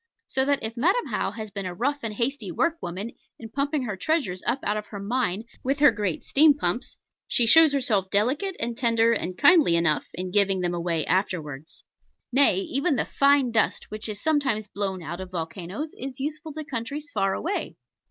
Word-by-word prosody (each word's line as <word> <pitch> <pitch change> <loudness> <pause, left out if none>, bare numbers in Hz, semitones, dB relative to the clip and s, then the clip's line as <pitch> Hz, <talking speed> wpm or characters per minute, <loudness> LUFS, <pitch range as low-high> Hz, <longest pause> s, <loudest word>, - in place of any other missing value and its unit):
So 265 0 0
that 285 0 +1
if 220 +1 -3
Madam 360 - +2
How - - 0
has 215 -2 -7
been 195 -1 -4
a 180 - -6
rough 280 +8 -1
and 220 -2 -4
hasty 235 -4 -1
workwoman 220 - -2 0.3
in 225 - -9
pumping 280 +2 -1
her 215 -5 -3
treasures 190 - -1
up 240 - +2
out 210 - 0
of 210 0 -4
her 205 - -8
mine 215 -1 -1 0.2
with 275 +2 0
her 290 -2 +6
great 205 -6 -2
steam 295 +1 +5
pumps, 180 -2 -2 0.3
she 240 - +2
shows 320 +5 +7
herself 225 -9 0
delicate 265 - +1
and 230 0 -2
tender 230 -2 +3
and 185 -4 -3
kindly 310 - +6
enough 170 -3 +1
in 185 +1 -4
giving 195 -1 +3
them 175 -1 -1
away 170 -2 -1
afterwards. 160 -6 -2 0.5
Nay, 255 -8 +4
even 275 - 0
the - - 0
fine 280 -3 +3
dust 220 -2 0
which 215 +1 -4
is 205 -1 -5
sometimes 280 -8 +1
blown 195 -3 -4
out 170 +3 -6
of 185 - -7
volcanos 180 - -5
is 265 +1 -6
useful 310 +3 -4
to 310 0 -5
countries 285 +3 -5
far 195 -2 0
away. 390 +5 -3
225 Hz, 190 wpm, -25 LUFS, 190-280 Hz, 0.5 s, shows